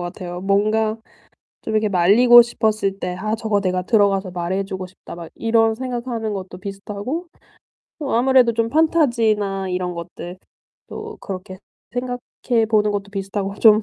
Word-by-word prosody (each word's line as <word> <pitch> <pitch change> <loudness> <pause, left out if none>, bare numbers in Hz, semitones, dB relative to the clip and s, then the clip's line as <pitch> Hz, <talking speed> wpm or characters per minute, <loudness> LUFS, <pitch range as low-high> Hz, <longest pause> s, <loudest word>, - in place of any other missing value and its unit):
같아요. 175 0 -6
뭔가 215 +3 +1 0.7
좀 220 - -4
이렇게 215 -1 +2
말리고 220 +7 +7
싶었을 215 -4 -1
때 180 0 -3
'아 215 +3 -1
저거 220 -2 0
내가 185 -1 0
들어가서 195 -2 +2
말해 180 +2 -2
주고 190 -1 -6
싶다.' 185 -1 -12
막 170 -1 -9
이런 225 -1 +2
생각하는 240 -3 -3
것도 185 -2 -6
비슷하고 205 - -5 0.7
어 285 - -3
아무래도 250 -1 +4
좀 230 0 0
판타지나 230 - +2
이런 180 0 -2
것들 175 +1 -8 0.5
또 435 0 -7
그렇게 185 -1 -7 0.3
생각해 245 -2 -2
보는 210 -1 +3
것도 200 0 -4
비슷하고 195 0 -3
좀 215 -1 +6
210 Hz, 320 characters per minute, -21 LUFS, 190-230 Hz, 0.7 s, 말리고